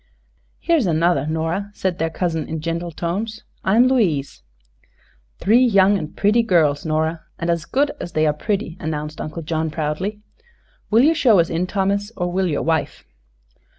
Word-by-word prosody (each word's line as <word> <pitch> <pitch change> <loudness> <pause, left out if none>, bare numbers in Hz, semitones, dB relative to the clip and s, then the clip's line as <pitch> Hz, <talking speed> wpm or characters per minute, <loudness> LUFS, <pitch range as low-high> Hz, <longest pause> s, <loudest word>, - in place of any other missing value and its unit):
"Here 335 -1 +2
is 245 -10 +1
another, 165 -3 +2
Nora," 165 +6 -2
said 185 -2 -2
their 165 - 0
cousin, 165 -1 -2
in 160 - -4
gentle 165 +2 -3
tones. 200 +7 -4 0.2
"I 190 - +2
am 245 +2 +6
Louise." 175 - 0 1.0
"Three 230 +6 +4
young 200 -4 +4
and 155 -6 -5
pretty 210 +3 +3
girls, 160 -9 +2
Nora; 160 +1 0 0.2
and 170 0 -1
as 170 -2 -2
good 285 +2 +1
as 175 - -6
they 155 0 +2
are 150 - +2
pretty," 195 +2 -3
announced 155 -1 -4
Uncle 160 +2 -6
John, 160 0 -1
proudly. 160 +7 -3 0.7
"Will 225 +3 +5
you 315 +3 +5
show 240 -9 +4
us 165 - +1
in, 170 +2 -1
Thomas, 200 +2 -1
or 175 -1 -1
will 185 +1 0
your 150 -4 -1
wife?" 160 -2 -1
170 Hz, 175 wpm, -21 LUFS, 160-205 Hz, 1.0 s, am